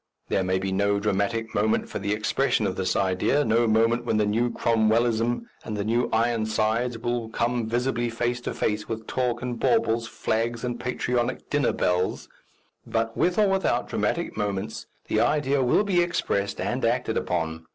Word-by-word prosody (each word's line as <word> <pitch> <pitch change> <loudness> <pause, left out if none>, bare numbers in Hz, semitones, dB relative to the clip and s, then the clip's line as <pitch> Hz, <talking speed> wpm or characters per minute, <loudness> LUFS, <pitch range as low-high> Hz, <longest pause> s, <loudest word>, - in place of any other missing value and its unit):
There 95 - +1
may 95 0 +1
be 95 +1 -2
no 100 +1 +1
dramatic 105 +3 -1
moment 110 +2 +1
for - - -5
the 100 +1 -2
expression 105 -1 +1
of - - -1
this - - -1
idea, 95 +9 +1
no 115 +1 +3
moment 115 +2 +3
when 120 - 0
the 105 - +3
new 115 +4 +1
Cromwellism 115 - +1 0.2
and 110 -2 -4
the 100 - -1
new 115 +3 +1
Ironsides 115 +1 +1
will 120 0 -2
come 120 0 -1
visibly 120 0 0
face 120 +1 -2
to - - -4
face 105 0 -1
with 110 -1 -4
talk 125 -1 -1
and 125 -1 -3
baubles, 115 - +2
flags 115 +1 -2
and 120 -1 -3
patriotic 125 -1 -2
dinner 145 -3 +2
bells; 90 +1 -1 0.5
but, 115 0 -2
with 180 0 +1
or 210 -1 +5
without 195 -1 +1
dramatic - - -1
moments, 105 -1 -3 0.2
the - - +1
idea 145 -2 +2
will 125 +11 +3
be 190 -4 +2
expressed 100 - -1
and - - -2
acted - - +1
upon. 80 -2 -2
115 Hz, 170 wpm, -25 LUFS, 105-120 Hz, 0.5 s, or